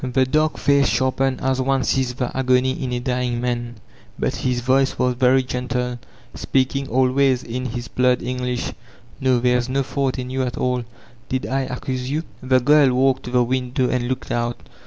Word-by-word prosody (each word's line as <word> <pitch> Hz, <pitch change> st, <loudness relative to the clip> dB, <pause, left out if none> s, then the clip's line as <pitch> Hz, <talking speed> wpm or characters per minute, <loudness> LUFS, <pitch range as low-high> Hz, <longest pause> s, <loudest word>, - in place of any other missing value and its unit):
The 130 Hz, +1 st, +2 dB
dark 155 Hz, +4 st, +1 dB
face 140 Hz, -1 st, +3 dB
sharpened 130 Hz, 0 st, 0 dB
as 130 Hz, 0 st, 0 dB
one 135 Hz, 0 st, +1 dB
sees 125 Hz, 0 st, 0 dB
the 125 Hz, -1 st, -3 dB
agony 130 Hz, 0 st, +2 dB
in 130 Hz, -1 st, -4 dB
a 125 Hz, -, -1 dB
dying 125 Hz, -1 st, -1 dB
man, 120 Hz, -1 st, -2 dB, 0.4 s
but -, -, -1 dB
his 125 Hz, -1 st, -1 dB
voice 135 Hz, +2 st, +2 dB
was 125 Hz, 0 st, +2 dB
very 130 Hz, +1 st, +3 dB
gentle, 125 Hz, -1 st, -3 dB, 0.3 s
speaking 135 Hz, +1 st, 0 dB
al 130 Hz, +2 st, +2 dB
wa]r8 130 Hz, -1 st, +2 dB
in 125 Hz, +2 st, -4 dB
his 120 Hz, 0 st, -5 dB
blurred 125 Hz, 0 st, +1 dB
English: 125 Hz, -1 st, -3 dB, 0.5 s
''No, 130 Hz, -2 st, +3 dB
there 125 Hz, 0 st, +3 dB
is 120 Hz, +1 st, -3 dB
no 135 Hz, +1 st, +1 dB
fault 135 Hz, 0 st, -1 dB
in 125 Hz, 0 st, -5 dB
you 130 Hz, 0 st, -1 dB
at 125 Hz, -2 st, -3 dB
all 125 Hz, -1 st, -1 dB, 0.4 s
Did 130 Hz, -1 st, -1 dB
I 135 Hz, 0 st, -1 dB
accuse 130 Hz, 0 st, -4 dB
you?" 155 Hz, +3 st, -1 dB, 0.2 s
The 130 Hz, 0 st, +3 dB
girl 145 Hz, +1 st, +5 dB
walked 130 Hz, 0 st, +2 dB
to -, -, -5 dB
the 125 Hz, 0 st, +3 dB
window 125 Hz, +1 st, -1 dB
and 125 Hz, -1 st, 0 dB
looked 130 Hz, 0 st, -4 dB
out. 120 Hz, 0 st, -2 dB
130 Hz, 195 wpm, -21 LUFS, 125-130 Hz, 0.5 s, girl